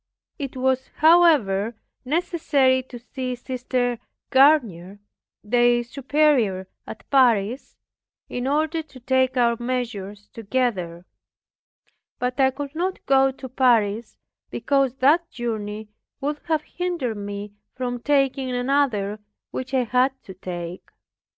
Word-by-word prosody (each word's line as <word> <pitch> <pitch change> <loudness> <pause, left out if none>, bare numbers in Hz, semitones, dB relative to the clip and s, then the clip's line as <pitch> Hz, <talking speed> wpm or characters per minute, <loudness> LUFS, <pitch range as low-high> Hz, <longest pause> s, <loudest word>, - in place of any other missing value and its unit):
It 275 -2 -5
was, 260 0 0
however, 290 - +4 0.3
necessary 285 -4 +2
to 255 -1 -11
see 255 +1 -5
Sister 245 -1 -2 0.3
Garnier, 235 - +3 0.5
their 240 +2 +3
superior 260 -7 +1 0.2
at 210 - -10
Paris, 245 -3 +2 0.5
in 245 +1 -4
order 310 +3 0
to 285 -4 -15
take 260 +1 +1
our 235 -1 +3
measures 220 -5 -4
together. 200 -7 -2 1.1
But 250 +2 -3
I 265 -1 +5
could 280 +1 -6
not 365 +4 -3
go 270 0 +4
to 265 0 -8
Paris, 235 -4 +1 0.3
because 275 -3 0
that 305 +6 +3
journey 215 -3 -5 0.3
would 295 +1 -3
have 315 -2 0
hindered 340 -13 -3
me 205 0 -6 0.2
from 245 -1 -3
taking 275 -1 +1
another, 245 -5 0 0.3
which 260 0 -5
I 260 -2 +2
had 255 +3 +1
to 190 - -10
take. 180 -1 -7
255 Hz, 115 wpm, -23 LUFS, 220-275 Hz, 1.1 s, I